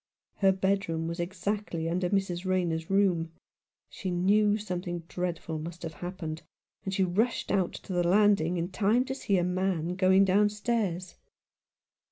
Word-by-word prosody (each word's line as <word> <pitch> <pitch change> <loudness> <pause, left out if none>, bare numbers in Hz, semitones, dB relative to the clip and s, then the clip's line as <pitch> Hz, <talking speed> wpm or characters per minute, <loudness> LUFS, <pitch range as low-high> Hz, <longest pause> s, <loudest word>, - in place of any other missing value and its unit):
Her 195 -1 +4
bedroom 190 -4 0
was 170 +1 -4
exactly 180 -1 -2
under 180 +2 0
Mrs. 190 -3 -1
Rayner's 175 -4 -1
room. 185 -5 +2 0.6
She 190 - -6
knew 205 +4 +3
something 180 -4 -4
dreadful 170 -3 -3
must 170 +2 -7
have 160 -1 -5
happened; 175 -3 -5 0.4
and 190 - -3
she 190 0 +1
rushed 215 +7 0
out 190 -3 +1
to 190 - -7
the 175 - +2
''landing 180 -1 +3
in 170 +1 -2
time 220 +6 +2
to 265 - -3
see 200 -7 0
a 175 - +2
man 180 -2 0
going 190 +1 +4
downstairs. 205 -2 0
185 Hz, 150 wpm, -29 LUFS, 175-200 Hz, 0.6 s, Her